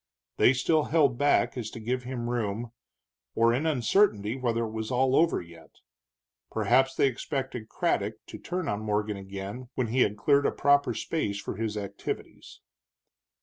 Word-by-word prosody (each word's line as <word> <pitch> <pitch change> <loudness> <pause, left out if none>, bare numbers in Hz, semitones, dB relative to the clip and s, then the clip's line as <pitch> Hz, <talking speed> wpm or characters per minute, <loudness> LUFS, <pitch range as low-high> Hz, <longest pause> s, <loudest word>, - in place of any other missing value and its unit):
They 125 - +6
still 150 +4 +2
held 140 -6 +2
back 145 0 +3
as 120 -4 -4
if - - -9
to - - -7
give 125 +3 -2
him 125 -2 -4
room, 115 -1 -2 0.6
or 115 +1 +4
in 140 +7 0
uncertainty 125 - +2
whether 120 -3 -1
it 110 - -6
was 110 0 -4
all 130 +1 +2
over 165 - +3
yet. 85 -1 -15 0.7
Perhaps 135 0 +2
they - - +3
expected 130 -3 -3
Craddock - - -1
to - - -10
turn 180 -2 -4
on 105 - -1
Morgan 105 -1 -1
again 100 +5 -7
when 125 -4 -1
he 125 +3 +2
had 105 -2 +2
cleared 140 +7 +3
a - - +1
proper 140 -4 +2
space 105 -11 -2
for - - -5
his 110 -1 -2
activities. 100 -1 -6
120 Hz, 170 wpm, -28 LUFS, 110-135 Hz, 0.7 s, They